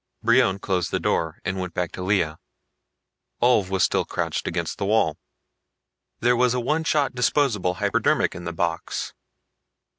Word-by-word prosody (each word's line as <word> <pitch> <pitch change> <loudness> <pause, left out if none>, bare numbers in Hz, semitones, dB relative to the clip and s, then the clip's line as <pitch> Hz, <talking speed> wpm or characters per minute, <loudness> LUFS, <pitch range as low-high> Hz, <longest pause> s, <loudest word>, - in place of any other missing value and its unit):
Brion 115 -4 +4
closed 95 -3 -1
the - - -1
door 80 -1 -1
and 95 +1 -2
went 90 -2 -5
back 90 -2 -1
to - - -7
Lea. 90 -5 +1 1.1
Ulv 120 -6 +3
was 95 -2 +1
still - - +2
crouched - - -3
against - - -3
the 100 - -1
wall. 100 -8 +2 1.0
There 120 +1 +4
was 125 0 +2
a - - 0
one 150 +7 0
shot 145 -3 +1
disposable 120 -8 +1
hypodermic 100 +1 +1
in 85 - -8
the 85 - -3
box. 85 0 -3
100 Hz, 155 wpm, -24 LUFS, 90-125 Hz, 1.1 s, Brion